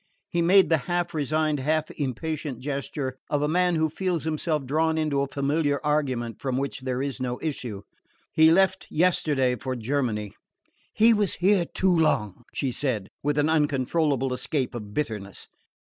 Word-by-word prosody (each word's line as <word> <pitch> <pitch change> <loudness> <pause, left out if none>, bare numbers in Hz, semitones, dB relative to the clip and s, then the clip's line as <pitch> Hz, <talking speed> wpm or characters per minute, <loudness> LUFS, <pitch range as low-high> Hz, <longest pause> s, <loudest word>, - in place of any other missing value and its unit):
He 170 - 0
made 190 +3 +5
the 160 -2 +3
half 175 0 0
resigned, 155 0 0
half 155 +3 0
impatient 145 0 -3
gesture 135 0 -4
of 145 - +1
the 150 - +1
man 180 +2 +2
who 160 0 +2
feels 175 +1 -2
himself 155 -2 -1
drawn 160 +4 +1
into 150 -3 +1
a 140 - 0
familiar 145 +1 0
argument 130 -6 -1
from 130 -2 -1
which 140 +1 -2
there 130 0 -2
is 140 -2 -4
no 125 -1 -2
issue. 120 -10 -4 0.5
"He 160 0 +6
left 190 +2 +3
yesterday 150 -7 +2
for 130 +3 -4
Germany." 115 -4 -2 0.6
"He 230 +2 +5
was 205 -3 +1
here 185 0 +3
too 190 -2 +2
long!" 115 - +1
she 135 -3 -2
said, 115 -7 -2
with 145 +1 0
an 145 +1 +3
uncontrollable 145 -2 +1
escape 130 +1 -2
of 105 -4 -7
bitterness. 105 - -4
145 Hz, 160 wpm, -26 LUFS, 130-160 Hz, 0.6 s, He